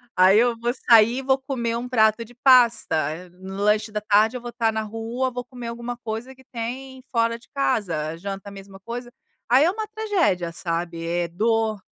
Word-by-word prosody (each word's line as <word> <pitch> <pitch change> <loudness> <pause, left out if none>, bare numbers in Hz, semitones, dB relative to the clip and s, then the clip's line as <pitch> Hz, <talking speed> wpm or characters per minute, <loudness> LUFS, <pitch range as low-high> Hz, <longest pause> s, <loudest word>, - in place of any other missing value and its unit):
Aí, 185 +3 +6
eu 240 -1 +2
vou 240 +1 0
sair 230 -1 +5
e - - -4
vou 265 0 +2
comer 250 -4 -3
um 245 +1 -5
prato 220 -1 +3
de 240 - -17
pasta, 245 -7 +4 0.2
eh, 180 +3 -8
no 190 +2 -10
lanche 210 +1 +2
da 210 0 -3
tarde, 210 +3 +3
eu 250 - -5
vou 240 - -6
estar 230 -2 0
na 220 - -1
rua, 225 +4 -3
vou 245 0 -5
comer 245 -1 -8
alguma 235 +1 -5
coisa 235 +2 -6
que 265 - -19
tem 260 +3 -6
fora 230 -1 +1
de - - -22
casa. 200 - -1
A 165 - -6
janta, 195 +2 -6
a - - -12
mesma 195 -1 -12
coisa". 240 +4 -7 0.4
Aí, 255 +4 +6
é 350 - +3
uma 435 +1 -5
tragédia, 390 - 0
sabe, 170 0 -4
é 170 0 -1
dor. 220 +4 0
230 Hz, 210 wpm, -23 LUFS, 200-250 Hz, 0.4 s, Aí